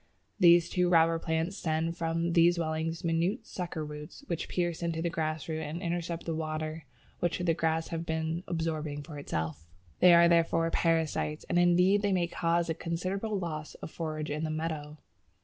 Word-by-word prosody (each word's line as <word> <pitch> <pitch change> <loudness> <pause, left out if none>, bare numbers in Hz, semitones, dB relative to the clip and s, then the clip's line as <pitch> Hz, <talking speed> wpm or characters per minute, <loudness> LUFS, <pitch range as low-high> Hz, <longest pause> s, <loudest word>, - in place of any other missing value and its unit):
These 170 -1 +7
two 180 -1 +2
robber 165 -1 +4
plants 165 +4 -1
send 160 -1 -1
from 165 0 -1
these 170 0 +5
swellings 165 0 -2
minute 170 +7 0
sucker 170 -4 -4
roots 150 - -9
which 170 - -3
pierce 175 -2 -1
into 170 -1 -1
the 170 +1 -1
grass 155 -2 -2
root 160 -1 -3
and 155 +2 -4
intercept 170 -1 -3
the 165 - -2
water 155 0 -4 0.3
which 175 -1 0
the 175 -2 +1
grass 160 0 0
has 165 -1 -3
been 160 +1 -2
absorbing 155 -3 -2
for 150 -1 -8
itself. 80 - -4 0.3
They 175 -1 +8
are 170 0 +7
therefore 165 -1 +3
parasites, 160 -2 0
and 175 - +3
indeed 180 +3 +4
they 205 -1 +1
may 180 -2 +2
cause 170 0 0
a 165 - 0
considerable 185 +6 -2
loss 155 -4 -5
of - - -9
forage 155 -2 -4
in 150 +2 -2
a - - -4
meadow. 155 -1 -4
165 Hz, 180 wpm, -30 LUFS, 155-170 Hz, 0.3 s, They